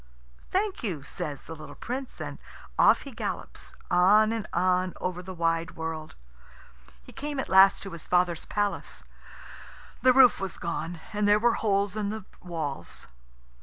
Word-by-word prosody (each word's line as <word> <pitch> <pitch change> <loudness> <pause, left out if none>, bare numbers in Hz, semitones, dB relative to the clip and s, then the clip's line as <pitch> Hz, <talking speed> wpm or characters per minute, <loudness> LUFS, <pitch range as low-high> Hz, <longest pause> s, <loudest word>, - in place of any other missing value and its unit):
"Thank 390 +1 0
you," 175 - -3
says 145 0 -5
the 160 - -8
little 155 -1 -10
Prince, 255 +2 -5
and - - -6 0.4
off - - +6
he 275 - -9
gallops, 230 - -6 0.2
on 205 +5 +5
and 225 -2 -3
on 185 +1 +1
over 180 -1 -3
the 185 +1 -8
wide 165 0 0
world. 160 -1 -5 0.9
He - - -13
came 290 -1 -4
at - - -2
last 190 +1 +6
to 195 - -7
his 170 -1 -8
father's 180 -2 +2
palace. 205 -1 -2 1.0
The 255 - +6
roof 255 -2 +6
was 195 -3 -4
gone, 170 0 -4
and 210 0 +1
there 205 0 +6
were 235 +2 +3
holes 200 -2 +1
in 210 -2 -1
the 215 -2 -5 0.2
walls. 160 -6 -4
190 Hz, 160 wpm, -28 LUFS, 170-215 Hz, 1.0 s, off